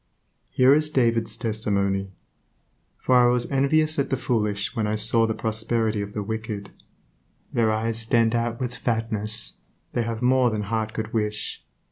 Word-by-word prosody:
Here 130 +2 +5
is 155 +1 +4
David's 115 -5 +1
testimony: 100 -4 -1 0.9
For 130 - 0
I 125 -1 +6
was 120 0 +2
envious 155 +3 +2
at 140 - 0
the 135 - 0
foolish 105 -4 -1
when 110 -3 0
I 105 - 0
saw 110 +1 +3
the 110 - -2
prosperity 110 -1 -1
of 100 0 -6
the 105 - -3
wicked...... 110 -1 -5 0.8
Their 115 -2 +2
eyes 110 +1 0
stand 115 0 +2
out 115 0 -1
with 125 -1 -3
fatness; 110 -2 -1 0.4
they 120 - 0
have 115 0 -3
more 130 0 +4
than 110 -2 -2
heart 110 +1 -2
could 110 0 -5
wish. 105 -2 -2
115 Hz, 160 wpm, -24 LUFS, 110-120 Hz, 0.9 s, I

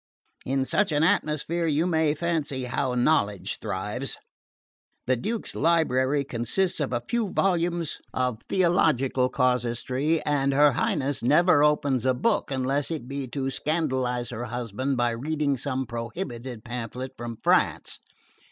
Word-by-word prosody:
In 135 0 +1
such 200 +6 +1
an 150 +1 +2
atmosphere 165 -1 +1
you 155 +2 +2
may 160 -3 +2
fancy 155 -5 -2
how 125 +1 -1
knowledge 120 - +1
thrives. 105 +8 -3 0.9
The 130 - +2
Duke's 220 - -3
library 145 -4 +2
consists 135 - -1
of 145 -4 -1
a 120 -1 -1
few 235 -4 0
volumes 175 -3 0
of 125 -3 -1
theological 140 -8 +2
casuistry, 125 +5 0
and 140 -2 +1
her 145 +1 +6
Highness 140 +2 0
never 150 +4 +4
opens 145 -4 +2
a 130 - +3
book 125 - +1
unless 135 +1 0
it 155 -7 -4
be 135 0 -4
to 135 +1 -3
scandalise 130 -6 -1
her 120 +1 -4
husband 125 +2 -3
by 120 -1 +2
reading 145 +4 -1
some 130 0 -2
prohibited 120 - -6
pamphlet 125 +2 -5
from 120 -1 -6
France. - - +2
135 Hz, 135 wpm, -26 LUFS, 125-155 Hz, 0.9 s, her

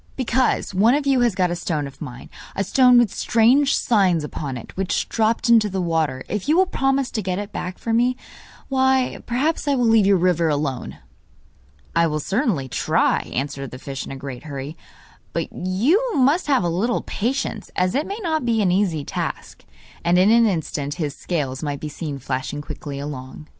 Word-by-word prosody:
'Because 255 -4 0
one 220 +7 +4
of 290 -1 -1
you 270 -2 +3
has 240 -5 +2
got 180 -2 +1
a - - -1
stone 155 -4 -2
of 140 0 -11
mine 125 -4 -8 0.3
a 195 - 0
stone 250 +4 +5
with 240 -5 +3
strange 250 +5 +3
signs 190 -8 +2
upon 145 -3 -5
it 115 - -11
which 190 -1 -1
dropped 225 +1 +1
into 225 -3 +5
the 190 0 -3
water. 160 -7 0
If 210 +6 -3
you 315 - +4
will 375 - +5
promise 270 -5 0
to 220 - -2
get 185 -2 -2
it 205 0 -5
back 180 0 -5
for 230 - -3
me, 245 +2 +2 0.5
why, 265 -1 +1
perhaps 290 +6 0
I 285 - +3
will 245 -2 +1
leave 225 -3 +5
your 200 -1 +5
river 170 -2 +2
alone.' 145 -3 -2 1.0
'I 170 0 +4
will 155 -1 -2
certainly 195 - 0
try,' - - +1
answered 135 0 -3
the 130 - -9
fish 135 0 -6
in - - -8
a - - -5
great 135 0 -8
hurry; 140 +1 -6 0.6
'but - - -3
you 215 - +1
must 285 +7 +3
have 270 -9 +3
a - - +1
little 195 +9 0
patience, 260 +6 -3
as 180 0 +1
it 290 +4 0
may 400 - -4
not 315 -4 0
be 230 -2 +1
an 185 - +2
easy 180 -6 +1
task.' - - -5 0.4
And 175 +1 +3
in 190 +4 +5
an 230 0 +5
instant 150 -6 -2
his 150 -4 -3
scales 140 -5 -3
might 145 -3 -3
be 155 - -5
seen 150 -1 -5
flashing 135 +2 -4
quickly 145 -1 -7
along. 140 0 -7
185 Hz, 200 wpm, -22 LUFS, 150-245 Hz, 1.0 s, stone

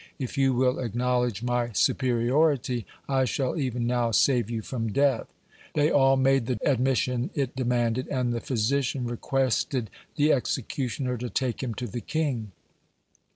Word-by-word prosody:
If 130 -2 -5
you 135 -2 +2
will 125 0 +2
acknowledge 125 -2 0
my 120 -1 -1
superiority, 125 - +1 0.2
I 135 -1 +2
shall 130 +1 -1
even 125 -6 -1
now 120 -1 +1
save 120 0 +3
you 115 -2 -3
from 115 -3 -3
death." 140 -1 +2 0.5
They 150 +1 +3
all 135 -1 +4
made 135 -2 +3
the 125 - 0
admission 130 -2 +1
it 135 -3 -1
demanded, 125 -1 0
and 125 -3 -1
the 115 - -3
physician 130 +2 0
requested 120 - -1 0.2
the 150 +1 +4
executioner 125 +1 -2
to 125 0 -4
take 125 -2 -2
him 120 -4 -3
to 125 - -4
the 120 +1 -5
king. 135 -10 -2
125 Hz, 150 wpm, -26 LUFS, 120-135 Hz, 0.5 s, all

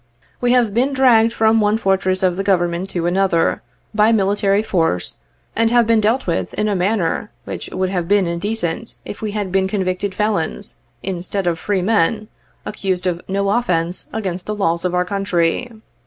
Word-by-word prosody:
We 245 - +3
have 240 -5 +3
been 260 +5 +1
dragged 235 -4 +5
from 225 -1 +3
one 210 +1 +2
fortress 190 -3 +1
of 180 -2 +2
the 195 - -2
Government 175 -1 0
to 170 -3 -2
another, 180 -1 +1 0.3
by 215 +1 +4
military 200 -1 +2
force, 165 - 0 0.4
and 225 0 +3
have 240 0 +4
been 225 -1 +3
dealt 225 +5 +1
with 170 - -2
in 215 - 0
a 205 - 0
manner 195 +1 0 0.2
which - - -6
would 185 0 -1
have 175 -3 -2
been 200 0 +3
indecent 175 +3 -2
if - - -8
we 215 -2 -3
had 205 -3 -3
been 190 0 +2
convicted 190 0 -2
felons, 205 -2 -1 0.3
instead 190 +1 -3
of 170 -2 0
free 195 +1 -1
men, 215 +1 +1 0.4
accused 190 -3 -2
of 175 -1 -1
no 195 +1 0
offence 180 -7 0
against 190 -5 -4
the 210 - -2
laws 170 -4 0
of 180 0 0
our 180 0 +1
country. 195 +3 0
195 Hz, 180 wpm, -19 LUFS, 180-215 Hz, 0.4 s, dragged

